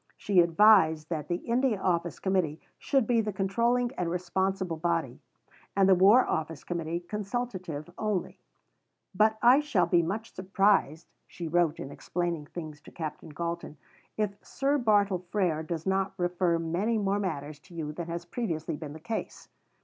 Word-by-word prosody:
She 200 -3 +2
advised 165 -3 +5
that 155 -3 -3
the 175 - 0
India 235 +2 0
Office 170 -2 0
Committee 180 -5 0 0.2
should 270 -4 +1
be 235 0 +3
the 210 -1 -2
controlling 235 +6 +1
and 175 -2 0
responsible 180 0 -1
body, 165 -6 -1 0.6
and 195 -1 +4
the 195 - +7
War 200 +8 +6
Office 160 -1 -3
Committee 170 -1 -3
consultative 195 - -4
only; 210 -4 -2 0.7
"but 215 +3 +3
I 250 +4 +7
shall 290 -13 +2
be 170 0 +3
much 215 +7 -4
surprised," 190 -4 +1 0.2
she 170 - -7
wrote 170 -1 +1
in 135 - -6
explaining 170 -1 -3
things 155 -3 -8
to - - -14
Captain 155 -1 -6
Galton, 170 0 -5 0.4
"if 205 -2 -2
Sir 280 +1 0
Bartle 205 -6 +2
Frere 175 -6 0
does 160 0 -5
not 190 0 0
refer 175 -1 +1
many 175 +8 0
more 200 -1 0
matters 150 -6 -4
to 175 +3 -17
you 155 -2 -4
than 170 +2 -6
has 170 +1 -5
previously 170 -7 -3
been 150 -1 -7
the 160 - -9
case." 220 +7 -5
180 Hz, 160 wpm, -29 LUFS, 165-205 Hz, 0.7 s, the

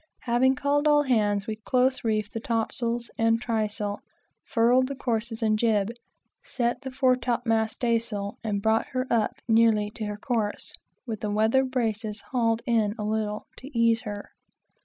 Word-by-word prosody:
Having 255 +2 +3
called 285 +2 +1
all 295 -1 +5
hands, 210 -6 +1
we 215 -1 -4
close 255 +3 +1
reefed 215 -2 -1
the 225 - -3
topsails 235 +1 -2
and 225 0 +3
trysail, 215 -3 -2 0.4
furled 245 +2 +3
the 275 - -5
courses 230 -3 -2
and 215 -1 +2
job, 215 -2 +2 0.5
set 240 0 -2
the 265 - -5
fore 260 -1 +3
top 245 -1 -2
mast 220 -1 +1
staysail, 225 -4 -1
and 205 -3 -2
brought 220 0 +2
her 255 0 0
up 225 -3 +1
nearly 220 -2 +3
to 215 0 -5
her 210 0 -4
course, 220 -2 -2 0.3
with 225 -4 -4
the 210 - -2
weather 220 +5 +3
braces 225 -4 -2
hauled 230 -2 +1
in 225 -4 +1
a 210 - -4
little, 210 0 -2
to 265 - -10
ease 230 -1 +3
her. 205 -3 -7
225 Hz, 165 wpm, -26 LUFS, 215-245 Hz, 0.5 s, all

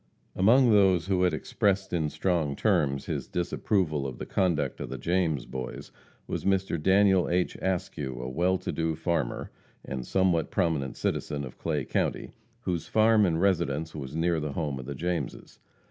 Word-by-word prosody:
Among 120 +6 +5
those 95 -5 +4
who 95 -2 +1
had 90 -1 +4
expressed 95 -2 0
in 80 -3 +1
strong 80 -5 0
terms 70 -1 +1
his - - -3
disapproval 85 -4 0
of 65 -2 -7
the - - -6
conduct 85 -6 0
of - - -5
the 65 - -5
James 80 -1 0
Boys, 65 -1 -6 0.3
was - - -4
Mr. 95 -4 0
Daniel 95 +1 +4
H. 90 0 0
Askew, 75 -8 -2
a 65 - -4
well 90 +8 +1
to - - -4
do 80 -1 -1
farmer, 80 -6 -2 0.3
and 65 -1 -4
somewhat 90 0 +1
prominent 80 -8 -1
citizen 70 -1 -2
of 65 - -11
Clay 75 -4 -1
county, - - -1 0.3
whose 90 -7 -2
farm 110 -1 +4
and 80 -1 0
residence 80 -5 +1
was 70 -2 -6
near 85 0 +1
the 75 -2 -4
home 70 -4 -2
of 65 - -8
the 70 - -4
Jameses. 85 +4 -4
85 Hz, 170 wpm, -28 LUFS, 70-95 Hz, 0.3 s, Among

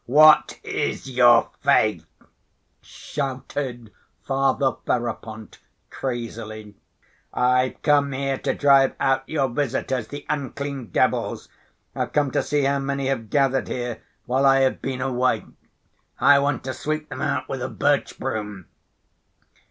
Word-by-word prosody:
What 155 +4 +6
is - - -3
your 120 -2 +5
faith?" 90 -7 +2 0.7
shouted 130 -4 -5 0.3
Father 135 0 +1
Ferapont 110 -2 -4 0.3
crazily. 115 -4 -5 0.6
"I've 125 +1 +1
come 145 -1 +3
here 135 0 -2
to - - -1
drive 140 -2 +4
out 135 0 +1
your 145 -4 +1
visitors, 130 -2 -2
the 145 +3 -8
unclean 140 -2 -4
devils. - - 0 0.5
I've - - -3
come 145 -2 +1
to - - +1
see 145 -1 0
how 140 +1 +1
many 140 0 -2
have 115 -5 -3
gathered 135 -2 +1
here 120 -2 -4 0.2
while 135 +2 +2
I 135 0 +5
have 130 -1 +1
been 130 -1 -3
away. 130 -1 0 0.7
I 145 0 +6
want 140 0 -1
to 130 - -4
sweep 155 +3 -3
them - - -6
out - - -1
with - - -4
a - - -3
birch - - 0
broom." 105 -4 -4
135 Hz, 130 wpm, -23 LUFS, 120-140 Hz, 0.7 s, What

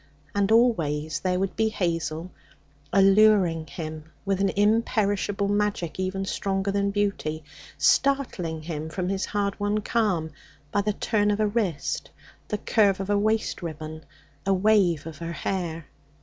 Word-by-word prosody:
And 200 0 +1
always 160 -11 +2
there 180 +1 0
would 195 0 -2
be 220 0 +2
Hazel, 170 -3 -2 0.6
alluring 195 -4 +4
him 155 0 -6 0.2
with 195 -1 0
an 195 - +3
imperishable 205 -1 +1
magic 205 -4 -1
even 190 +1 -2
stronger 195 0 -1
than 200 0 +1
beauty, 200 -6 -1 0.3
startling 175 - +1
him 160 -1 -4
from 180 +2 -3
his 195 0 -1
hard 200 -1 -2
won 205 +1 0
calm 200 -8 0 0.4
by 205 - +2
the 210 +1 0
turn 205 0 +1
of 205 0 +1
a 215 - +3
wrist, 205 -8 -1 0.4
the 210 - -2
curve 200 -2 +2
of 195 +1 -2
a 205 - +3
waist 215 0 0
ribbon, 155 -1 -6 0.4
a 195 0 +2
wave 185 -6 +3
of 160 -3 -8
her 170 0 -4
hair. 170 -4 -3
195 Hz, 150 wpm, -26 LUFS, 165-205 Hz, 0.6 s, alluring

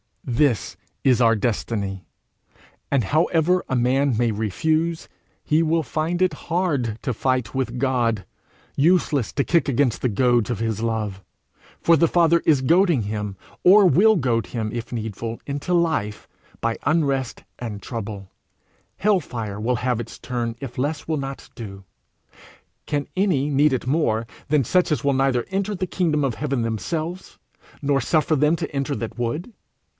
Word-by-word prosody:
This 125 -2 +1 0.3
is 130 -3 +4
our 115 -1 +5
destiny; 100 -3 -2 0.8
and 140 -4 +2
however 165 - +2
a 130 - 0
man 130 +1 +2
may 120 -1 +2
refuse, 160 - -1 0.4
he 155 +1 +2
will 165 0 +1
find 165 +4 -2
it 185 -4 +2 0.2
hard 145 - 0
to 125 - -1
fight 125 -1 -1
with 130 -2 -2
God 120 -6 0 0.5
useless 150 -5 +2
to 140 - +1
kick 170 +2 +2
against 135 -3 +1
the 125 - +1
goads 120 +1 +2
of 120 - -2
his 110 -2 -2
love. 110 -4 -2 0.6
For 165 - +5
the 165 - +4
Father 170 0 +3
is 145 -4 +4
goading 170 - +3
him, 105 -1 -4 0.3
or 200 +3 +7
will 195 +7 +5
goad 120 - 0
him, 110 -3 -3
if 120 -1 -5
needful, 115 0 -4
into 145 +5 -3
life 160 -12 0 0.3
by 115 0 0
unrest 140 -4 0 0.2
and 110 -4 -5
trouble; 100 -5 -6 0.7
hell 205 -1 +3
fire 110 - -5
will 120 +3 0
have 125 0 0
its 120 - -7
turn 120 -2 -3
if 130 -3 -8
less 145 +3 -2
will 160 -1 0
not 135 -1 -6
do: 100 -5 -8 1.0
can 145 -2 -1
any 175 -8 +1
need 145 0 +3
it 130 - -2
more 125 -6 +1 0.2
than 150 -2 +3
such 180 +8 +2
as 145 -6 0
will 140 -1 +2
neither 135 -2 +1
enter 200 +2 -1
the 185 0 -2
kingdom 160 -5 0
of 130 -5 0
heaven 140 -4 -1
themselves, 160 - -4 0.5
nor 140 -1 +2
suffer 155 +5 +2
them 150 +3 +3
to 160 - -5
enter 140 +1 -1
it - - -4
that 115 +1 -6
would? 135 - -2
135 Hz, 160 wpm, -23 LUFS, 115-160 Hz, 1.0 s, or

